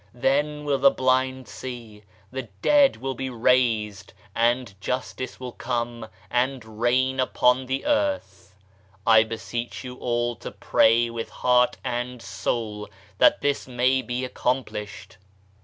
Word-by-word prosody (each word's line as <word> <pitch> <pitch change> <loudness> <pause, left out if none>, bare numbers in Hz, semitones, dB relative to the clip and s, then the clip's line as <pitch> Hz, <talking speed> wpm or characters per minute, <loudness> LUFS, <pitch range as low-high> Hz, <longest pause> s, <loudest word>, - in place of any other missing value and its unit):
Then 150 +4 0
will 140 -2 +1
the - - +7
blind 130 0 0
see, 110 -1 -8 0.3
the 130 -3 -5
dead 285 -2 +5
will 135 0 -3
be 130 +1 -4
raised, 115 -4 +1 0.2
and 120 0 +1
Justice 130 +2 -4
will 125 -1 -6
come 120 -2 -3 0.2
and 120 -3 -2
reign 130 +2 +2
upon 130 0 +2
the 130 +1 -2
earth. 290 - -1 0.5
I 110 -1 +7
beseech 115 +2 -4
you 125 0 -8
all 120 -1 -1
to - - -7
pray 115 +1 +3
with 115 -1 -5
heart 125 0 +2
and 125 0 -3
soul 105 +1 -3 0.3
that - - +5
this 145 -2 0
may 130 +1 +2
be 125 0 -3
accomplished. 115 -7 -3
125 Hz, 130 wpm, -25 LUFS, 115-130 Hz, 0.5 s, the